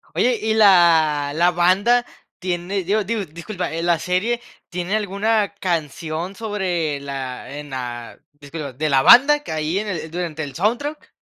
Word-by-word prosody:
Oye, 245 -1 +2
¿y 220 0 0
la 165 -8 +4
la 175 +2 +3
banda 195 +8 +3 0.3
tiene? 180 +1 -2
Digo 205 +4 +1
digo, 210 0 -2
disculpa, 175 +4 -6
eh, 165 +1 -3
la 170 -2 +2
serie, 210 +8 -1 0.3
¿tiene 180 +3 -2
alguna 210 +1 0
canción 165 +1 -3
sobre 180 -9 -2
la 135 0 -6
en 145 0 -8
la 120 -2 -6
disculpa, 145 -1 -8
de 155 +4 -2
la 135 -2 +4
banda 285 - +7
que - - -7
hay 155 +4 -1
en 215 - -4
el 160 -4 -4
durante 165 -3 -4
el 140 -2 -8
soundtrack? 240 - -2
175 Hz, 160 wpm, -21 LUFS, 155-205 Hz, 0.3 s, banda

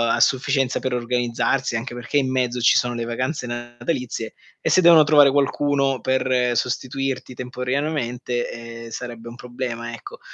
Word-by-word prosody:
a - - -2
sufficienza 135 -1 +2
per 130 - -2
organizzarsi, 120 +1 0
anche 120 +1 -5
perché 120 +4 -2
in 135 -2 +2
mezzo 125 -1 0
ci 120 - +5
sono 120 -1 +1
le 115 - -3
vacanze 125 +3 -3
natalizie 120 -1 -4 0.3
e - - 0
se 185 - +5
devono 170 -3 +8
trovare 145 -2 +6
qualcuno 140 -1 +1
per 130 -2 +1
sostituirti 130 +1 -2
temporaneamente, 125 -1 -2
ehm, 115 0 -9
sarebbe 120 0 -7
un 115 - -10
problema, 120 -1 -5
ecco. 115 - -10
125 Hz, 150 wpm, -22 LUFS, 120-135 Hz, 0.3 s, devono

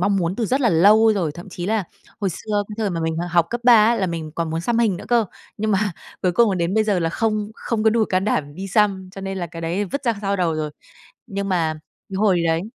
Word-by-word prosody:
mong 200 +2 +2
muốn 175 0 -1
từ 230 - -1
rất 265 +6 +1
là 245 - +3
lâu 215 +6 +5
rồi, 170 -6 0
thậm 175 +4 -10
chí 175 -1 -6
là 215 -1 0 0.4
hồi 195 -3 0
xưa 205 +3 -2
cái 210 - -6
thời 215 -3 0
mà 170 -2 -3
mình, 160 0 -1
ờ, 175 - -2
học 170 -1 +2
cấp 240 - -2
ba 245 -1 +8
á, 235 - +4
là 190 - 0
mình 165 -3 -4
còn 165 -1 -2
muốn 165 +1 -2
xăm 235 +6 0
hình 220 -6 +2
nữa - - -9
cơ. 235 -2 +3 0.3
Nhưng 215 +1 -1
mà 200 -1 +1 0.3
cuối 180 - +2
cùng 230 +4 +4
là - - 0
đến 170 +2 -1
bây 220 0 +3
giờ 205 -3 +1
là 165 -1 0
không 215 +2 -1
không 225 -1 -2
có 220 - +6
đủ 225 0 +2
can 185 -2 0
đảm 145 -8 -1
đi 190 +4 -6
xăm, 195 -2 +1
cho 195 - -8
nên 195 0 -4
là 175 - -3
cái 165 0 -9
đấy 175 +5 -1
vứt 280 +9 -5
ra 235 -2 +2
sau 200 -1 -1
đầu 175 -4 +1
rồi. 155 -1 -3 0.6
Nhưng 200 0 -4
mà 165 -4 +1 0.4
cái 195 - -4
hồi 190 -4 +3
đấy 165 0 +2
195 Hz, 285 wpm, -21 LUFS, 170-215 Hz, 0.6 s, ba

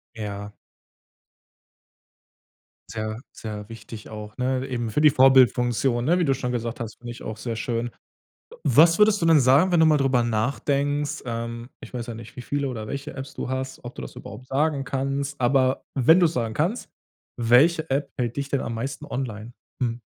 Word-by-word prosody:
Ja. 105 -1 -6 2.4
Sehr, 110 0 -4
sehr 105 -1 -7
wichtig 115 -1 -10
auch, 105 -1 -8
ne? 130 +1 0
Eben 120 -3 -2
für 110 - 0
die 150 -1 +7
Vorbildfunktion, 125 -2 +4
ne? 175 +5 +3
Wie 175 - +2
du 135 - +3
schon 125 -2 -3
gesagt 120 0 -3
hast, 115 -2 -6
finde 120 0 -8
ich 120 - -10
auch 110 0 -6
sehr 115 +1 -4
schön. 115 +1 -2 0.6
W 480 - -13
was 165 +3 +5
würdest 210 -1 +5
du 165 - +1
denn 160 -2 +6
sagen, 140 +8 +4
wenn 170 - +4
du 160 - +6
mal 155 -1 +5
drüber 135 -3 +2
nachdenkst 140 +5 -1
ähm, 115 0 -4
ich - - -11
weiß 120 -1 -4
ja 120 - -6
nicht, 115 +3 -11
wie 125 - -6
viele 140 +2 -2
oder 110 -4 -5
welche 140 +5 -5
Apps 135 0 -7
du - - -4
hast 130 -1 -4
ob 120 - -7
du - - -8
das - - -9
überhaupt 125 - -10
sagen 140 +1 0
kannst, 140 +2 -2
aber 130 +1 +2
wenn 145 +6 +5
du 175 - +6
es 155 - -2
sagen 115 -3 -2
kannst, 175 - -1 0.5
welche 140 +8 +4
App 140 +1 0
hält 120 -3 -2
dich 140 -1 -3
denn 140 - 0
am 115 - -4
meisten 135 +5 -4
online? 120 -4 -5 0.3
Mhm. 120 -1 -1
130 Hz, 195 wpm, -24 LUFS, 115-140 Hz, 2.4 s, die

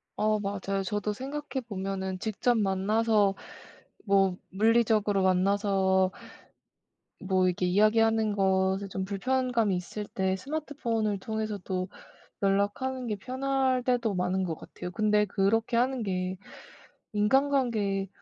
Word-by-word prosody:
어 215 0 +1
맞아요. 195 -1 -2
저도 210 +1 -2
생각해 275 +3 -5
보면은 190 -2 -3
직접 225 +3 0
만나서 205 +1 +2 0.7
뭐 195 -3 +3
물리적으로 215 -1 +2
만나서 190 0 +2 1.1
뭐 185 -1 +1
이렇게 180 0 0
이야기하는 215 +3 +3
것에 190 0 +1
좀 190 0 -3
불편감이 230 +1 0
있을 190 +4 -5
때 190 -1 -1
스마트폰을 235 -5 -2
통해서도 205 -4 -3 0.5
연락하는 205 +7 0
게 215 - -2
편할 260 +3 0
때도 240 -5 +1
많은 180 +1 0
것 165 -3 -2
같아요. 180 - -8
근데 210 +2 +2
그렇게 220 +4 +1
하는 255 +1 +1
게 185 -2 -2 0.8
인간관계에 215 -4 +1
205 Hz, 270 characters per minute, -28 LUFS, 190-230 Hz, 1.1 s, 뭐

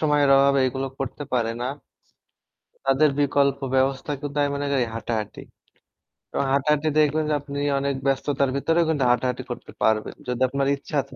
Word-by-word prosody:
সময়ের 145 -2 +3
অভাবে 140 0 +4
এগুলো 135 +2 -3
করতে 135 +2 -4
পারে 115 -2 +1
না 125 - -1 1.2
তাদের 135 +3 +4
বিকল্প 140 -1 +2 0.2
ব্যবস্থা 135 +2 +1
কিন্তু 145 0 -5
আমি 145 - +2
মনে 145 0 -2
করি 125 -3 +2
হাঁটাহাঁটি। 115 -2 -4 0.9
এবং - - 0
হাঁটাহাঁটি 150 +2 +2
দেখবেন 155 +1 +2
যে - - +1
আপনি 140 0 -6 0.2
অনেক 140 0 -1
ব্যস্ততার 135 0 +1
ভেতরে 165 +4 +1 0.3
হাঁটাহাঁটি 125 +1 0
করতে - - -7
পারবেন। 110 -1 +1
যদি 125 0 -3
আপনার 140 +1 0
ইচ্ছা 145 +1 -2
থা 135 - -14
140 Hz, 155 wpm, -24 LUFS, 130-145 Hz, 1.2 s, অভাবে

